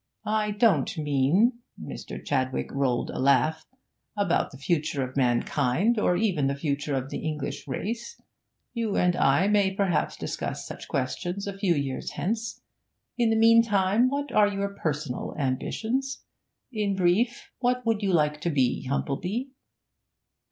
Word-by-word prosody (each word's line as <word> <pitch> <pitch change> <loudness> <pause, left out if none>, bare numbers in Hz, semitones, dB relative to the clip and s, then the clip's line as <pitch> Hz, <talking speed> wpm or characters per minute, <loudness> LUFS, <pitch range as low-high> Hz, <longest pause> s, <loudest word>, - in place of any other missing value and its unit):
I 215 0 +1
don't 210 -3 +2
mean' 155 - +2 0.2
Mr. - - -8
Chadwick 130 -2 -1
rolled 135 -3 0
a - - -5
laugh 140 +4 +2 0.5
'about 200 -4 +1
the 135 - -12
future 150 -1 0
of 130 - -14
mankind, 135 - +2
or 180 -4 +2
even 180 -9 +1
the 140 - 0
future 140 0 -2
of 135 +1 -3
the - - -3
English 150 -3 -4
race; 230 - -4 0.5
you 225 -4 -1
and 180 -1 +3
I 140 +8 +3
may 205 -2 +3
perhaps 190 -6 0
discuss - - -4
such - - -8
questions 175 +9 -2
a 200 -1 -4
few 195 -3 +1
years 140 -2 -3
hence. 230 +4 -3 0.6
In 235 -2 +3
the 225 - +2
meantime, 225 0 +4
what 285 0 -3
are 210 -2 +5
your 200 0 -2
personal 150 -8 -3
ambitions? 225 - -2 0.5
In 205 -3 0
brief, 190 +7 +1
what 250 0 0
would 225 -2 +1
you 195 -2 +1
like 150 -3 +2
to 170 - 0
be, 130 -3 +1
Humplebee?' 180 - -2
180 Hz, 145 wpm, -27 LUFS, 140-220 Hz, 0.6 s, are